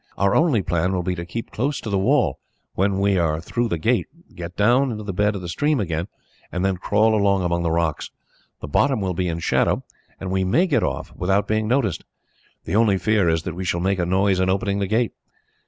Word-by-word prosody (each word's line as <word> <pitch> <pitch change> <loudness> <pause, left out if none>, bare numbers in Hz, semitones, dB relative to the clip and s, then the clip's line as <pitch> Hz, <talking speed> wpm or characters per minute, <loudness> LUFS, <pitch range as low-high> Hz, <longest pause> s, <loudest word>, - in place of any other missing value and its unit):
Our 100 0 +2
only 150 - +3
plan 90 +2 0
will 90 -1 -1
be 90 - -1
to 85 -1 -6
keep 115 +6 -6
close 140 +6 -1
to 110 - -5
the 100 - +2
wall, 120 - +2 0.3
when 95 +1 +1
we 100 -1 +2
are 80 -2 +1
through 120 +8 -2
the 85 - -1
gate, 115 +9 +1 0.3
get 85 +1 -8
down 120 +6 +3
into 105 -1 -5
the 100 -2 -4
bed 105 +3 +1
of 95 - -5
the - - -5
stream 145 - 0
again, 85 -3 -2 0.4
and 90 +2 -1
then 95 -1 0
crawl 105 +4 +2
along 100 -3 +2
among 85 0 0
the 85 - 0
rocks. 80 -1 -1 0.5
The - - -6
bottom 130 - +2
will 95 -2 -1
be 90 +1 -1
in 85 -1 -2
shadow, 85 - +1 0.4
and 95 -1 -5
we 95 0 +1
may 125 - +3
get 170 - +1
off - - -3
without 95 +3 +1
being 110 0 0
noticed. 115 - 0 0.6
The - - -2
only 110 -3 +4
fear 105 -3 +2
is 80 -1 0
that 90 - -4
we 90 +3 -5
shall 85 -1 -1
make 95 +1 0
a 90 - +1
noise 95 +1 +2
in 95 0 +2
opening 100 +1 0
the 100 - -1
gate. 110 +3 +1
95 Hz, 235 wpm, -22 LUFS, 90-110 Hz, 0.6 s, only